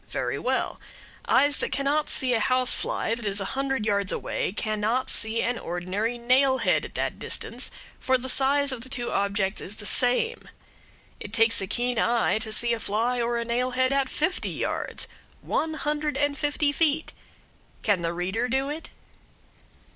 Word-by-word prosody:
Very - - -2
well; - - -1 0.5
eyes 285 +1 +4
that - - -2
cannot 285 +2 +1
see 255 -1 +2
a 230 - +2
house 255 +3 +2
fly 225 - 0
that 235 0 -5
is 200 -1 +1
a 195 - -2
hundred 270 -4 -1
yards 200 -2 +1
away - - -2
cannot 215 +4 -1
see 220 +1 +1
an 245 0 -1
ordinary 185 +7 -2
nailhead 260 +2 +3
at - - -11
that - - -2
distance, - - -3 0.3
for 260 0 +2
the 255 +1 -6
size 275 +2 +3
of 255 -3 -4
the 260 - -7
two 245 -2 -2
objects 200 0 0
is 200 - -6
the 210 - -9
same. 255 - +1 0.7
It 205 - -7
takes 225 -2 +4
a 195 - -3
keen 245 +3 0
eye 235 -2 +2
to 220 0 -4
see 235 +2 +2
a 230 - -2
fly 230 +4 0
or 235 0 0
a 235 - -2
nailhead 250 +2 +1
at 275 -1 +1
fifty 320 +5 -1
yards - - -3 0.3
one 315 0 -1
hundred 300 0 -1
and 290 0 +1
fifty 290 0 +1
feet. 315 +1 +1 0.7
Can 205 -6 +2
the 165 0 -1
reader 190 +8 -2
do 265 +3 0
it? 310 +3 -6
245 Hz, 175 wpm, -26 LUFS, 215-275 Hz, 0.7 s, eyes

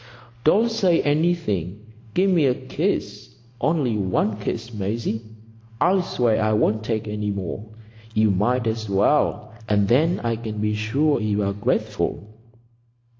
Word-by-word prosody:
"Don't 220 +9 +4
say 185 -7 +2
anything. 145 - 0 0.4
Give 190 +1 +3
me 165 -6 +4
a 125 - +2
kiss. 130 - -3 0.3
Only 135 -7 +1
one 100 +2 0
kiss, 115 +3 -4
Maisie. 110 +2 -2 0.6
I'll 185 +2 +3
swear 120 -9 +1
I 110 0 +2
won't 110 0 +1
take 110 -1 -2
any 105 0 -3
more. 100 +2 -5 0.5
You 110 -1 +4
might 115 +6 +1
as 110 -1 -2
well, 100 +2 +1 0.2
and 105 -1 +3
then 155 - +3
I 115 -1 -1
can 110 -2 -6
be 105 0 0
sure 125 +7 +1
you're 105 -2 0
grateful." 100 0 -1
110 Hz, 135 wpm, -23 LUFS, 105-145 Hz, 0.6 s, Don't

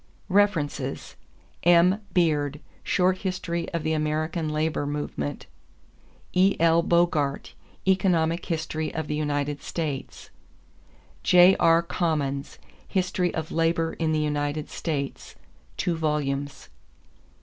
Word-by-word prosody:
=References= 190 -7 0 0.5
M. 175 +4 +5
Beard, 150 -5 +1 0.2
Short 185 0 +1
History 170 -3 -3
of 170 -3 -2
the 160 - 0
American 155 +1 -1
Labor 155 -1 -1
Movement. 145 - -4 0.9
E.L. 170 -3 +4
Bogart, 170 -5 +1 0.3
Economic 175 -3 +2
History 160 -2 -2
of 160 -1 -2
the 150 - -3
United 145 -1 -2
States. 150 -5 -5 0.9
J.R. 175 -2 +5
Commons, 150 -6 -2 0.3
History 180 -2 0
of 160 -1 -4
Labour 165 0 +1
in 160 -1 -1
the 155 - +1
United 150 0 -2
States 140 -5 -4 0.4
(2 175 - 0
vols.). 145 -3 -2
160 Hz, 100 wpm, -25 LUFS, 150-175 Hz, 0.9 s, M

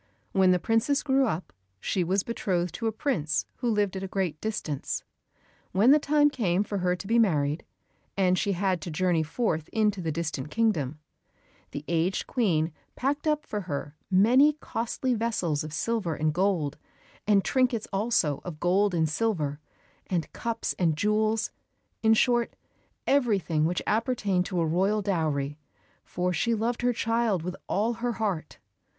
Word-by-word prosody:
When 190 -1 +4
the 180 - +5
princess 225 - +1
grew 270 -2 +3
up 165 - -3 0.3
she 180 - 0
was 190 +3 +1
betrothed 180 -7 -1
to 230 - -2
a - - +1
prince 220 - -1
who 245 - -1
lived 205 -3 +1
at 190 - -3
a 195 - -3
great 185 -5 -2
distance. 170 -10 -3 0.7
When 210 +8 +5
the 300 - +7
time 295 0 +3
came 200 -8 +1
for 205 -1 -3
her 180 0 +1
to 180 - -9
be 230 +4 +3
married, 150 -8 +2 0.5
and 185 -2 +3
she 200 +2 0
had 185 -1 0
to 170 - -5
journey 170 +1 +1
forth 160 -1 -1
into 210 -3 +1
the 165 -2 -2
distant 155 -3 -3
kingdom, 160 - 0 0.7
the 145 +1 -7
aged 170 +3 0
Queen 170 - +1 0.2
packed 285 +4 -1
up 305 0 +1
for 210 - -3
her 145 -4 -5
many 245 +10 +5
costly 255 -2 -2
vessels 200 -10 -1
of 155 - -7
silver 195 0 -1
and 155 0 0
gold, 175 -5 0 0.5
and 200 -2 +4
trinkets 250 -4 +1
also 195 - +1
of 165 -4 -7
gold 185 +3 +2
and 160 -1 +2
silver; 155 -6 -1 0.5
and 175 -4 -2
cups 230 -1 -2
and 165 -4 +2
jewels, 215 +4 +1 0.5
in 225 0 +5
short, 240 0 +2 0.5
everything 195 - +2
which 175 +2 -1
appertained 210 -5 +1
to 180 - -2
a 165 - +2
royal 195 +6 +1
dowry, 150 -6 -1 0.4
for 180 0 -2
she 230 +6 +1
loved 230 +3 -1
her 245 0 +3
child 230 -5 0
with 180 +1 -4
all 220 +4 +1
her 235 +1 -2
heart. 200 -9 -3
195 Hz, 165 wpm, -27 LUFS, 165-230 Hz, 0.7 s, the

